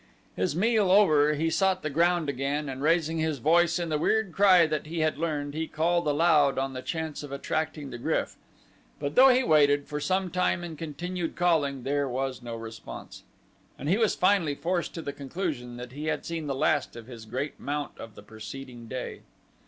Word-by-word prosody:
His 95 +10 -1
meal 215 +1 +2
over 155 -7 +5
he 160 +2 0
sought 190 +1 +1
the 155 - -1
ground 170 +1 +2
again 140 +2 -2
and 135 0 -5
raising 165 +1 +2
his 160 -2 0
voice 170 +6 +3
in 170 -2 -3
the 155 -1 0
weird 220 +2 +1
cry 185 -3 +6
that 155 -1 -3
he 165 +1 -3
had 155 -2 0
learned, 145 -3 -2
he 160 +1 -3
called 170 +1 0
aloud 150 -2 +3
on 135 0 -1
the 130 - -5
chance 160 +1 -4
of 145 -2 -9
attracting 150 +1 -3
the 120 - -7
GRYF, - - -1 0.6
but 140 0 -3
though 265 +1 +8
he 255 0 +4
waited 145 - +4
for 150 - -4
some 185 +3 0
time 180 -1 0
and 170 -2 -6
continued 170 +2 -4
calling 150 -7 +1
there 140 +1 0
was 130 +1 -3
no 120 -1 -6
response, 115 0 -9 0.6
and - - -6
he 195 +6 +3
was 220 -2 +2
finally 180 -6 +2
forced 175 +3 -2
to 165 - -5
the 140 - -4
conclusion 140 -5 -4
that 125 0 -8
he 145 +4 -6
had - - -2
seen 165 -2 -4
the 135 - -2
last - - +1
of 120 -1 -9
his 115 -2 -10
great 130 +6 -4
mount 145 0 -4
of 115 -2 -9
the - - -12
preceding 115 +3 -9
day. 130 +2 -6
150 Hz, 200 wpm, -27 LUFS, 135-170 Hz, 0.6 s, though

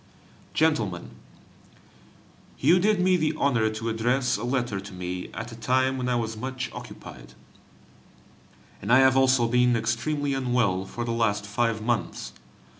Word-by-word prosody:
GENTLEMEN, 115 - 0 1.5
You 165 +7 +4
did 210 +1 +2
me 185 0 +3
the 155 -2 0
honor 120 -6 +2
to 110 +1 -5
address 125 +3 +1
a 105 - -5
letter 120 -5 -1
to 100 0 -10
me 90 0 -5
at 115 +2 -6
a - - -8
time 130 +3 +1
when 125 0 -2
I 125 - +1
was 115 -2 -2
much 130 +2 -5
occupied, - - -11 1.5
and 105 - -3
I 130 - +8
have 130 -1 +5
also 130 -2 +4
been 125 0 +3
extremely 130 +6 -1
unwell 120 -8 0
for 120 +4 -5
the 115 - -2
last 110 -3 0
five 110 +1 -1
months. 120 -1 -2
120 Hz, 150 wpm, -26 LUFS, 110-130 Hz, 1.5 s, I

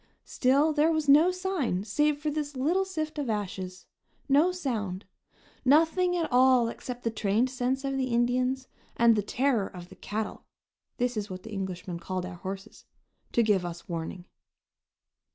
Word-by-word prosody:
Still 280 +5 +2
there 305 +2 +3
was 315 -2 0
no 300 +5 +7
sign, 365 - -1
save 295 +7 +1
this 300 -1 -2
little 335 +9 +1
sift 315 -5 -4
of 275 -5 -2
ashes, 190 -3 -4 0.4
no 300 +6 +4
sound; 220 - -3 0.6
nothing 330 +6 +4
at 330 -2 0
all 250 -1 +5
except 245 +1 -7
the 230 - 0
trained 220 +4 +1
sense 260 +1 -1
of 275 0 -1
the 260 -1 0
Indians 250 +2 +1 0.3
and 235 -1 +6
the 210 - +1
terror 240 0 +1
of 175 -1 -10
the 190 - -13
"cattle" 215 +1 -4 0.5
(this 245 0 0
is 210 -1 -3
what 185 -1 -7
the 225 - -9
Englishmen 185 -3 -4
called 185 +1 -4
our 180 -1 -7
horses) 195 +2 -8 0.5
to 235 - +4
give 205 -4 +2
us 170 -1 -7
warning. 170 +1 -5
245 Hz, 160 wpm, -28 LUFS, 200-295 Hz, 0.6 s, no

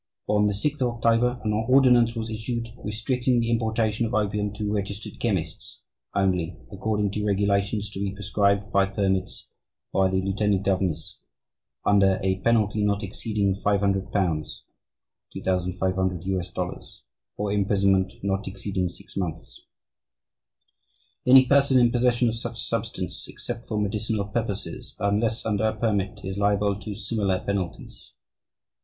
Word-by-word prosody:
On 105 0 +3
6th 135 +9 -1
October, 120 0 +2
an 105 -2 0
ordinance 120 +1 +4
was 115 -1 -3
issued, 115 +1 -3
restricting 120 +4 0
the 115 0 0
importation 110 -1 +1
of 115 - -3
opium 105 -1 0
to 105 0 -2
registered 100 0 -4
chemists, 90 -9 -3 0.4
only, 90 -4 +1
according 105 0 -1
to 105 +1 -3
regulations 100 +1 +1
to 95 - -7
be 100 -1 -1
prescribed 100 0 0
by 100 0 +3
permits 95 -1 -1 0.5
by 95 -1 +3
the 95 0 +1
lieutenant 100 +1 0
governor 95 -4 +1 0.9
under 100 -2 +4
a 95 0 +1
penalty 110 -2 +2
not 100 0 +1
exceeding 100 0 -1
£500 100 -1 0
($2,500), 90 +1 -3 0.4
or 105 -1 -1
imprisonment 100 -2 +2
not 100 0 -1
exceeding 95 -1 -2
six 100 +3 -14
months. 85 -4 -5 1.7
"Any 130 +1 +9
person 140 0 +4
in 120 -1 +4
possession 120 0 +2
of 115 - +1
such 115 0 -5
substance... 110 -6 -3
except 120 -1 -7
for 105 -2 -1
medicinal 105 0 -1
purposes, 105 -1 -4
unless 110 +3 0
under 110 -1 +1
a 110 0 +1
permit, 105 -3 -1
is 95 +1 -4
liable 100 0 +2
to 105 -1 -6
similar 100 -2 0
penalties. 95 -4 -5
105 Hz, 125 wpm, -25 LUFS, 95-110 Hz, 1.7 s, Any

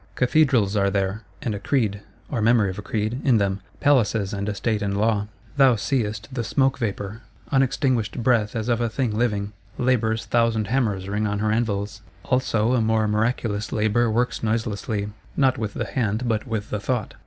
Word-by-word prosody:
Cathedrals 125 -6 +3
are 100 -1 +3
there, 100 +1 -1 0.2
and 115 - -1
a 100 - -4
Creed 105 -3 0 0.3
(or 120 -6 -1
memory 110 -3 +4
of 95 - -8
a - - -4
Creed) 110 +4 -2
in 130 -5 +4
them; 100 -1 0 0.2
Palaces, 110 -8 +2
and 100 +1 -2
a 105 - -3
State 110 0 -1
and 100 -1 -1
Law. 105 -1 +1 0.3
Thou 135 -3 +6
seest 105 -3 -1
the 120 -3 -2
Smoke 135 +6 +1
vapour; 105 -1 -3 0.3
_un_extinguished 130 -4 +1
Breath 115 -3 +2
as 110 0 -2
of 120 -1 +1
a 120 - +1
thing 115 -2 -1
living. 105 -3 0 0.2
Labour's 115 -3 +1
thousand 115 -3 +1
hammers 105 -7 0
ring 105 +1 -1
on 105 0 -1
her 105 +1 0
anvils: 105 -3 -1 0.2
also 120 -2 +1
a 125 - +3
more 110 -1 +2
miraculous 105 0 -1
Labour 110 +2 +2
works 120 +3 0
noiselessly, 110 -2 -1 0.3
not 135 -2 +3
with 105 -2 -3
the - - -2
Hand 115 0 -1
but 110 +2 -1
with 110 -3 -3
the 105 - -1
Thought. 110 +1 -2
110 Hz, 185 wpm, -24 LUFS, 105-120 Hz, 0.3 s, Thou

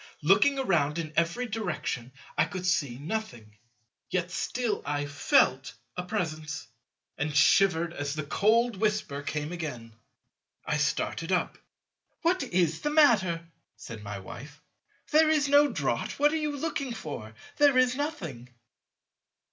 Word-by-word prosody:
Looking 205 - +4
around 170 - +1
in 155 -2 -4
every 170 +9 +1
direction 175 - -3 0.2
I - - +3
could 185 -1 -6
see 145 -9 0
nothing; 135 - -5 0.5
yet 180 -1 -1
still 235 +2 -2
I 145 0 -2
felt 135 -3 +2 0.2
a - - -2
Presence, 155 - -4 0.5
and 145 0 -2
shivered 170 +1 +4
as 145 -1 -3
the 155 - -3
cold 220 +8 +2
whisper 210 -9 -1
came 150 +2 -3
again. 135 -10 -6 0.7
I 150 - 0
started 150 +3 -1
up. 180 - 0 0.6
"What 360 +3 +2
is 170 -3 0
the 295 - 0
matter?" 205 - +4 0.3
said 115 -4 -9
my 100 -1 -6
Wife, 140 +10 -10 0.5
"there 310 +1 +5
is 300 -2 +3
no 285 +1 +5
draught; - - -2
what 295 +1 +4
are - - +1
you 300 -2 -2
looking 280 -4 -3
for? 110 -8 -7 0.2
There 285 -3 +5
is 255 0 +4
nothing." 170 - -5
170 Hz, 140 wpm, -28 LUFS, 145-245 Hz, 0.7 s, there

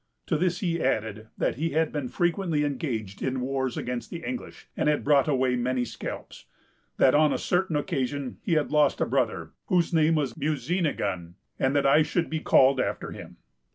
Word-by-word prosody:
To 165 - 0
this 175 +2 0
he 170 -3 -1
added, 110 -4 -1
that - - 0
he 165 +3 -1
had 160 0 +1
been 145 -4 -3
frequently 170 -1 0
engaged 125 -9 -3
in 130 0 -1
wars 130 -1 -2
against 120 -2 -4
the 165 -1 -7
English, 255 -1 -6
and - - +1
had 150 - +1
brought 140 -1 +4
away 130 -3 +2
many 125 0 0
scalps; 115 - -7 0.5
that, 130 - +5
on 150 0 +4
a - - 0
certain 180 -2 0
occasion, 140 -2 -2
he 175 - -1
had 155 -2 +1
lost 150 -2 +3
a - - +2
brother, 115 -11 -1 0.2
whose 175 -2 +1
name 160 0 +4
was 140 -6 0
Musinigon, 135 - -2 0.2
and 130 +2 +1
that 140 - +2
I 140 +3 +6
should 160 +2 -1
be 160 - -1
called 135 -3 +4
after - - -2
him. - - -10
145 Hz, 190 wpm, -26 LUFS, 125-160 Hz, 0.5 s, I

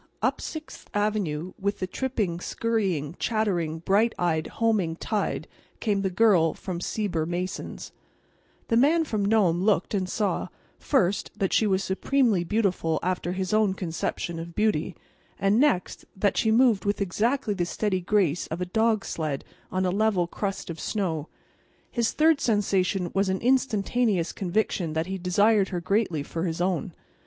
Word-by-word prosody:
Up - - +1
Sixth 315 -1 -8
avenue, 195 -5 -1
with 200 +1 -1
the 185 - -2
tripping, 205 -5 -2
scurrying, 185 -9 -1
chattering, 185 -8 0
bright 200 +7 +2
eyed, 160 -3 0
homing 210 -8 0
tide 210 +4 -2 0.3
came 205 -3 0
the 195 - 0
Girl 185 -5 +4
from 175 -3 -5
Sieber 175 -7 -1
Mason's. 180 +2 -4 0.8
The 230 - +3
Man 310 +7 +4
from 215 -9 -2
Nome 200 -5 +3
looked 200 -2 +1
and 190 -3 -1
saw, 210 0 -1 0.3
first, 200 -8 +1
that 195 - 0
she 220 - +3
was 190 -1 +1
supremely 215 0 +1
beautiful 180 -4 0
after 180 0 -1
his 185 +1 -2
own 215 -3 +3
conception 170 -1 -3
of 170 0 -8
beauty; 190 -6 +1 0.4
and 200 +3 +2
next, 265 -11 +1
that 200 0 +2
she 220 - +2
moved 230 -3 +4
with 205 0 0
exactly 215 +5 0
the 175 -3 -1
steady 190 -1 -1
grace 180 -4 +1
of 160 - -4
a 180 - -1
dog 220 +3 +1
sled 155 -4 -3 0.3
on 185 0 0
a 180 - +1
level 200 -2 +2
crust 195 0 -4
of 165 - -8
snow. 170 -8 -2 0.6
His 235 -2 +1
third 315 -2 +3
sensation 195 -4 +1
was 195 0 +1
an 190 0 0
instantaneous 230 -6 +1
conviction 180 -3 -1
that 160 +1 0
he 190 +1 -4
desired 200 +3 +3
her 180 - -2
greatly 175 -4 0
for 165 +4 -3
his 165 -1 -2
own. 180 0 -1
195 Hz, 160 wpm, -26 LUFS, 175-215 Hz, 0.8 s, Girl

